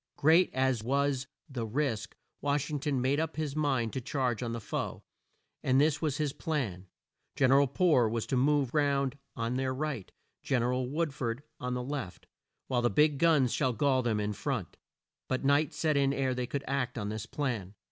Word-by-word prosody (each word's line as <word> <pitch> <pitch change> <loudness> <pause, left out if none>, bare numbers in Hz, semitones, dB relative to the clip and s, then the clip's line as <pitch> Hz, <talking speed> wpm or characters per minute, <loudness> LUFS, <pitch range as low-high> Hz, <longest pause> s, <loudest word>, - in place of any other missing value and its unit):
Great 160 +5 +5
as 130 -3 +1
was 140 +1 0 0.2
the 130 -6 -4
risk, 110 -2 -2 0.3
Wash 145 +1 0
ing 150 - -1
ton 140 -2 0
made 135 +4 +1
up 160 0 -2
his 150 -3 -3
mind 135 -7 0
to 130 - -2
charge 125 -2 -1
on 120 -2 -2
the 115 - -3
foe, 105 - -4 0.6
and 130 0 +3
this 150 0 +3
was 150 -4 0
his 150 -3 -1
plan: 110 - -3 0.5
Gen 130 -2 +3
er 135 +1 +7
al 140 - +3
Poor 135 -5 +3
was 115 0 -2
to - - -1
move 140 0 +2
round 140 -2 +2 0.2
on 115 +1 -1
their 130 0 -1
right, 140 -8 -3 0.3
Gen 125 -3 +1
er 125 +1 +1
al 125 0 -1
Wood 155 +2 -1
ford 125 0 -3 0.2
on 125 0 -2
the 125 - -2
left, 130 -8 -5 0.4
while 125 -2 +1
the 120 - +3
big 150 +3 +4
field 140 - -7
guns 150 -7 +4
should 130 -5 0
gall 135 -1 +3
them 115 -3 0
in 105 0 -1
front. - - -3 0.5
But 130 +1 -1
night 145 +1 +3
set 155 -2 0
in 140 -1 +3
ere 135 -2 0
they 125 -1 -2
could 140 +2 -3
act 130 -2 -1
on 105 -2 -2
this 110 +1 -5
plan. 115 -9 -3
135 Hz, 210 wpm, -30 LUFS, 120-145 Hz, 0.6 s, er